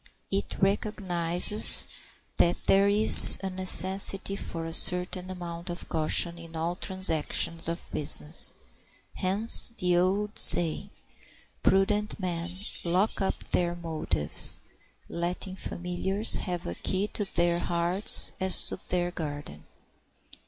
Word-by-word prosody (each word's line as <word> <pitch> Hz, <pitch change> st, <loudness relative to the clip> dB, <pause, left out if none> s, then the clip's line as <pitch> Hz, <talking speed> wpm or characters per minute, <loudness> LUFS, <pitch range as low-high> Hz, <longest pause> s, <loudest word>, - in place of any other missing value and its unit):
It 195 Hz, +1 st, -7 dB
recognizes 190 Hz, -1 st, +2 dB, 0.5 s
that 175 Hz, 0 st, -3 dB
there 195 Hz, +1 st, 0 dB
is 210 Hz, +2 st, +9 dB
a 190 Hz, -, -7 dB
necessity 190 Hz, +1 st, +3 dB
for 165 Hz, -4 st, -9 dB
a 165 Hz, -, -10 dB
certain 180 Hz, +1 st, -1 dB
amount 175 Hz, -1 st, -11 dB
of 175 Hz, +1 st, -7 dB
caution 170 Hz, +2 st, -3 dB
in 165 Hz, -1 st, -16 dB
all 165 Hz, +2 st, -6 dB
the 180 Hz, -, -22 dB
transactions 165 Hz, -3 st, -2 dB
of 170 Hz, +1 st, -9 dB
business; 150 Hz, +1 st, +1 dB, 0.6 s
hence 205 Hz, +5 st, +5 dB
the 180 Hz, -1 st, -2 dB
old 200 Hz, +4 st, -4 dB
saying, 165 Hz, -3 st, +4 dB, 0.7 s
"Prudent 210 Hz, +3 st, -3 dB
men 175 Hz, -2 st, -7 dB, 0.3 s
lock 185 Hz, +5 st, -4 dB
up 195 Hz, -, -7 dB
their 175 Hz, -1 st, -4 dB
motives, 155 Hz, -, -2 dB, 0.5 s
letting 180 Hz, +2 st, -8 dB
familiars 190 Hz, +3 st, -2 dB
have 180 Hz, -3 st, -9 dB
a 85 Hz, -, -8 dB
key 190 Hz, -, -5 dB
to 210 Hz, -, -7 dB
their 170 Hz, 0 st, -2 dB
hearts 175 Hz, +3 st, +2 dB
as 190 Hz, -1 st, -1 dB
to -, -, -8 dB
their 175 Hz, -1 st, -4 dB
garden." 145 Hz, -, -11 dB
180 Hz, 120 wpm, -23 LUFS, 170-195 Hz, 0.7 s, is